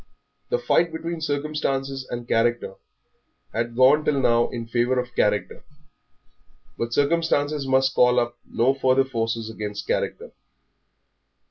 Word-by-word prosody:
The 485 - +1
fight 170 - +1
between 165 0 -5
circumstances 140 -3 -2
and 120 0 -6
character 120 -3 0 0.8
had 115 +1 -2
gone 135 +5 +5
till 145 -2 +1
now 120 -2 +3
in 115 -2 -5
favour 120 +2 +1
of 125 -1 -5
character, 105 -4 0 1.1
but 115 0 -3
circumstances 145 0 +1
must 135 0 +2
call 125 0 +4
up 120 0 -2
no 125 +3 +1
further 135 0 +2
forces 115 -3 -2
against 105 -2 -6
character. - - -2
130 Hz, 125 wpm, -23 LUFS, 120-145 Hz, 1.1 s, gone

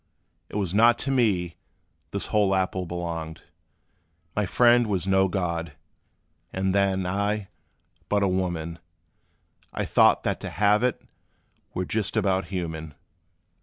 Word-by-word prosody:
It - - -10
was 95 -4 -1
not 115 +3 +5
to 135 - 0
me 100 -10 +1 0.5
this - - -3
whole 100 -2 +3
apple 95 -1 -1
belonged: 85 -2 -5 0.9
My 105 -2 0
friend 120 +2 +4
was 95 -4 -1
no 95 0 +3
god 85 -4 -2 0.8
and 95 0 -1
then 95 -1 +1
I, 100 +2 -1 0.6
but 100 -1 +2
a - - +3
woman; 85 -3 -2 0.9
I - - -3
thought - - +4
that - - -1
to - - -5
halve 105 +4 +3
it 125 -1 0 0.7
were 90 - -1
just 105 +1 -1
about 95 -1 +1
human. 80 -5 -5
95 Hz, 130 wpm, -25 LUFS, 85-105 Hz, 0.9 s, not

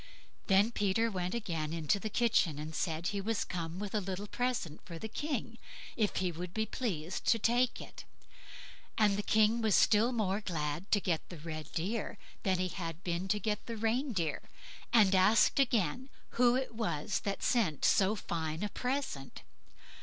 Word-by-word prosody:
Then 200 +4 +4
Peter 225 +2 +1
went 185 +1 -2
again 165 -9 -3
into 165 +4 +1
the 220 - -4
kitchen, 210 - +2
and 155 +1 -6
said 165 0 -1
he 200 -1 -2
was 220 +2 -1
come 170 -1 -4
with 205 0 -5
a 215 - +1
little 190 +1 -4
present 235 -9 -2
for 170 -2 -8
the 220 - -5
King, 240 -2 -4 0.4
if 215 -3 0
he 185 -1 0
would 175 +2 -7
be 220 0 +1
pleased 185 -8 -3
to 230 - +5
take 240 +3 +2
it. - - -10 0.9
And 210 -2 +4
the 205 - -1
King 220 +2 +3
was 220 -3 +3
still 220 +3 +4
more 210 -4 0
glad 160 -1 -3
to 205 - +4
get 175 -5 -2
the 175 - -8
red 155 0 -7
deer 200 +6 -2 0.2
than 190 -2 +1
he 185 0 -1
had 170 -1 -6
been 175 +1 -2
to 210 +2 +1
get 210 0 -2
the 230 -1 -4
reindeer, 225 - 0 0.5
and 210 -5 +5
asked 195 +8 +5
again 240 - +1 0.2
who 245 0 +3
it 260 -2 -2
was 215 -5 -1
that 200 -1 -3
sent 195 - +1
so 200 +2 +4
fine 160 -3 -3
a 210 - -1
present. 250 - -3
200 Hz, 175 wpm, -32 LUFS, 170-225 Hz, 0.9 s, to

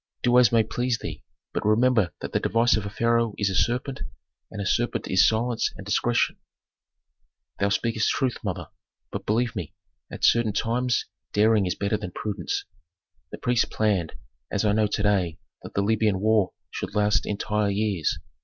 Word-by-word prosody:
"Do 125 0 +5
as 120 -4 +5
may 115 -1 +4
please 120 +2 -1
thee, - - -7 0.3
but - - -2
remember 110 -3 +3
that - - -5
the - - +1
device 115 +1 +3
of 105 -2 -2
a - - -4
pharaoh 115 0 +1
is 100 -2 +1
a - - -2
serpent, 125 +6 0 0.5
and - - -8
a 100 - -2
serpent 120 +5 0
is 95 +1 +5
silence 115 +1 0
and 95 - -9
discretion." 120 +4 +1 1.2
"Thou 100 - +2
speakest 110 +1 +1
truth, 130 -2 0
mother, - - -4 0.4
but - - -6
believe 120 +3 +1
me, 90 -7 -5 0.4
at - - -8
certain 115 -3 +3
times 120 +4 0 0.3
daring 105 -2 +4
is 90 - -1
better 100 +2 0
than 105 -3 -6
prudence. 100 -5 -3 0.7
The - - -6
priests 125 -1 +2
planned, 100 -7 0 0.4
as 100 - -1
I 105 - +4
know 105 0 +2
to 105 0 -2
day, 95 -5 +1 0.2
that - - -11
the 100 - +2
Libyan 105 -2 +2
war 105 -2 +2 0.2
should 100 - -5
last 105 +1 +2
entire 105 0 0
years. 100 -5 0
110 Hz, 175 wpm, -25 LUFS, 100-115 Hz, 1.2 s, Do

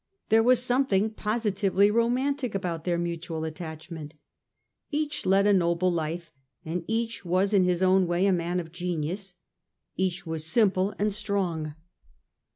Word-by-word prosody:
There 225 +1 +5
was 245 +1 +4
something 245 -5 +2
positively 210 -2 +1
romantic 245 +2 0
about 170 -4 -3
their 175 -1 +1
mutual 170 -1 -3
attachment. 160 -1 -7 0.7
Each 295 -5 -2
led 195 +1 +4
a 205 - +5
noble 175 0 +2
life; 165 0 -3 0.3
each 225 +8 -2
was 185 +3 +1
in 190 -3 +5
his 180 0 +1
own 185 0 +4
way 175 +2 +1
a 195 - +4
man 175 +1 -1
of 165 -2 -7
genius; 180 +2 -4 0.6
each 190 0 -1
was 160 -1 -3
simple 190 +2 +2
and 210 0 +1
strong. 185 -7 -2
185 Hz, 140 wpm, -27 LUFS, 170-210 Hz, 0.7 s, There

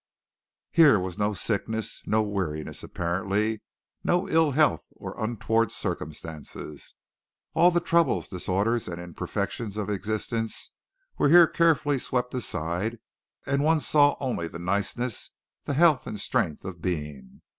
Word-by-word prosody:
Here 155 -8 +7
was 90 +1 -5
no 105 0 +1
sickness, 110 +2 -2
no 110 0 +3
weariness 90 -7 -3
apparently, 100 +5 -1 0.4
no 175 +2 +1
ill 160 -1 +4
health 150 +2 +2
or - - -7
untoward 115 0 +1
circumstances. 80 -6 -6 0.6
All 170 +3 +6
the 175 -1 +1
troubles, 170 -1 +2
disorders 100 +5 0
and 85 -1 -5
imperfections 95 +4 -4
of 105 -1 -2
existence 110 +3 -3 0.5
were 145 - +4
here 175 +2 +9
carefully 155 -4 +2
swept 125 0 -1
aside 105 -2 -2 0.5
and 140 +1 +1
one 160 +1 +4
saw 145 -1 +4
only 120 -11 -2
the 85 - -8
niceness, 100 +6 -2 0.4
the 140 - -2
health 155 -3 +4
and 105 - -5
strength 75 - -1
of 90 -3 -7
being. 75 -7 -4
110 Hz, 130 wpm, -27 LUFS, 90-140 Hz, 0.6 s, here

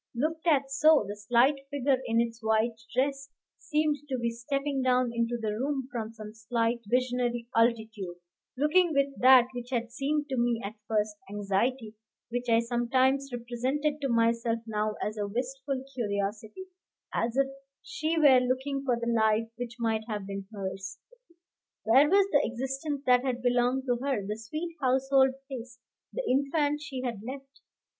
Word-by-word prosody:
Looked 315 +6 -2
at 275 -4 +3
so, 300 -3 +5
the 205 - -5
slight 240 +7 +3
figure 275 -2 +1
in 230 0 +2
its 230 0 -1
white 220 +1 +2 0.2
dress 275 +1 -1 0.3
seemed 305 -1 0
to 260 - -1
be 235 -1 -1
stepping 275 +4 -2
down 255 -1 +2
into 235 +1 0
the 220 -2 -2
room 265 +3 -2
from 225 -3 -4
some 215 -2 -10
slight 230 +2 -1
visionary 245 0 0
altitude, 220 -5 +1 0.4
looking 325 +4 +3
with 280 0 +2
that 255 -1 +7
which 245 0 -6
had 235 -2 -2
seemed 290 +4 -1
to 265 - -2
me 235 -1 +1
at 200 - -5
first 210 -1 0
anxiety, 210 +4 -1 0.4
which 245 0 -2
I 230 0 +5
sometimes 260 +3 +1
represented 255 +5 -2
to 275 - -1
myself 230 0 +2
now 215 -1 -1
as 215 +1 -3
a 205 - -1
wistful 260 +4 -3
curiosity, 210 - -3 0.5
as 235 +2 -1
if 275 - +4 0.4
she 330 -8 -2
were 280 -5 +7
looking 260 +2 -1
for 255 -3 +1
the 235 - -3
life 225 -1 +2
which 240 0 -6
might 225 -2 -1
have 210 -3 -4
been 195 0 -6
hers. 190 -2 -5 0.9
Where 265 +7 +5
was 395 +1 +5
the 285 - +5
existence 270 +4 -3
that 250 0 +4
had 250 -2 -2
belonged 245 +1 +2
to 245 -2 +1
her, 265 -8 -1
the 210 +2 -3
sweet 310 +10 -6
household 265 0 +3
place, 250 -3 -8 0.3
the - - -4
infant 290 +2 +1
she 265 -4 -6
had 235 -5 -3
left? 270 +4 -9
245 Hz, 165 wpm, -29 LUFS, 230-275 Hz, 0.9 s, that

